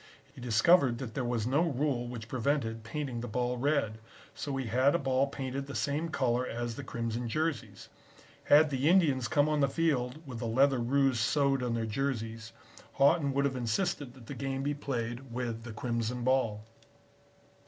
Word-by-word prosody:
He 135 - -12
discovered 120 +3 +4
that 120 -3 -6
there 130 - -2
was 120 -3 -1
no 135 +6 +2
rule 140 -6 0
which 115 -2 -7
prevented 115 -2 -1
painting 125 0 -4
the 120 - -5
ball 125 +2 -1
red, 125 -5 0 0.3
so 140 -2 -4
he 135 - -2
had 130 +6 +3
a - - +5
ball 135 -2 +1
painted 135 0 -4
the 140 - -7
same 150 +4 -1
color 125 -5 +1
as 120 -1 -3
the 140 - -7
crimson 115 -1 -3
jerseys. 120 - -3 0.6
Had 150 +1 +6
the 135 +3 +2
Indians 145 -10 +3
come 145 -1 +3
on 150 -1 +1
the 140 -2 +3
field 140 -3 0
with 125 -4 -7
the 115 - -3
leather 135 +3 +3
ruse 130 0 +2
sewed 135 +3 +2
on 120 -2 -1
their 115 -1 -1
jerseys, 115 -2 -3 0.4
Haughton 140 +1 +3
would 140 +1 +1
have 135 -2 0
insisted 125 - -2
that 125 -3 -14
the - - -7
game 135 -1 -3
be 145 +1 0
played 125 -2 -4
with 120 -2 -3
the 120 - -6
crimson 115 +1 -2
ball. 115 -5 +1
130 Hz, 185 wpm, -31 LUFS, 115-140 Hz, 0.6 s, Had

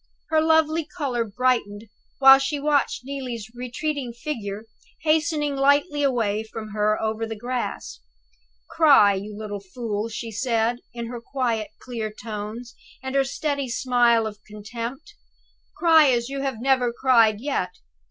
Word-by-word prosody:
Her 315 -1 +4
lovely 320 0 +3
color 275 -8 -2
brightened 225 -2 -1 0.3
while 270 0 +8
she 285 +2 -2
watched 290 -3 +1
Neelie's 250 -6 -6
retreating 250 +1 -4
figure 220 -5 -5 0.4
hastening 310 -2 +1
lightly 285 +2 +2
away 230 -7 +1
from 220 0 -8
her 210 0 +1
over 220 +1 -2
the 225 - -5
grass. 245 - -4 0.7
"Cry, 275 -11 +5
you 205 +2 -6
little 210 -1 -5
fool!" 210 +2 -4
she 225 +1 -6
said, 230 +1 0 0.2
with 235 -1 -4
her 240 0 -7
quiet, 235 -4 -2
clear 225 -4 -5
tones, 215 +2 -7 0.3
and 265 0 -4
her 275 0 +3
steady 280 -1 -2
smile 240 -2 +3
of 210 -1 -6
contempt. 235 - -7 0.6
"Cry 320 -4 +6
as 240 -1 +1
you 275 0 -4
have 270 -5 -3
never 255 -1 +2
cried 230 -4 +3
yet! 220 -9 -2
245 Hz, 140 wpm, -24 LUFS, 220-275 Hz, 0.7 s, while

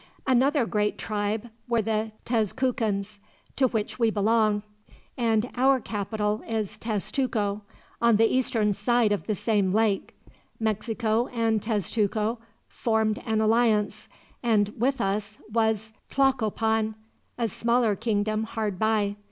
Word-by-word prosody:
"Another 265 +1 +3
great 210 -1 0
tribe 215 +2 -2 0.2
were 230 -2 +2
the 220 0 -1
Tezcucans, 220 -3 -1 0.4
to 265 - +3
which 220 0 -3
we 230 -1 +4
belong; 215 0 +2 0.5
and 225 -1 +1
our 265 +1 +3
capital 210 -1 -2
is 220 -3 -3
Tezcuco, 215 -1 -1 0.4
on 235 -1 +5
the 225 +2 +5
eastern 225 -4 +1
side 225 +2 +2
of 205 - -1
the 215 - 0
same 200 -2 +1
lake. 210 -1 +1 0.4
Mexico 220 +1 0
and 225 -3 0
Tezcuco 215 +1 0 0.3
formed 220 -2 0
an 220 -1 +1
alliance; 215 -2 +2 0.3
and 215 -4 +2
with 265 +4 0
us 200 +1 -2 0.2
was 220 -1 0 0.2
Tlacopan, 225 -4 +1 0.4
a 235 -2 0
smaller 235 0 +1
kingdom, 215 0 0
hard 215 -4 -3
by. 215 -2 +1
220 Hz, 120 wpm, -26 LUFS, 210-230 Hz, 0.5 s, on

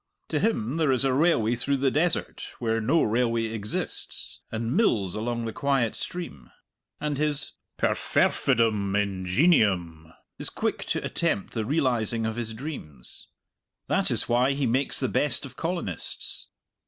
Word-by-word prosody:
To - - 0
him 150 - 0
there 155 -4 +3
is 130 +1 +3
a 135 - +2
railway 130 -6 +3
through 140 +4 0
the 135 0 +2
desert 165 +4 0
where 115 -1 0
no 145 +10 +3
railway 115 +1 +1
exists, 110 -2 -5
and 115 +3 -2
mills 105 - +2
along 115 +2 -2
the 115 - -4
quiet 135 -5 +1
stream. 170 - -6 0.5
And 150 -2 -2
his 150 -1 +2 0.3
perfervidum 105 -4 +2
ingenium 95 - +2 0.3
is - - 0
quick - - -2
to - - -2
attempt 100 - -1
the 110 -2 -1
realizing 120 -5 +1
of 110 0 -2
his 115 -2 -4
dreams. 95 - -9 0.6
That - - +1
is - - +2
why 125 +3 +3
he 140 0 0
makes 130 +4 +1
the 130 - +1
best 140 0 0
of 135 - -11
colonists. 165 - -4
120 Hz, 145 wpm, -26 LUFS, 110-140 Hz, 0.6 s, there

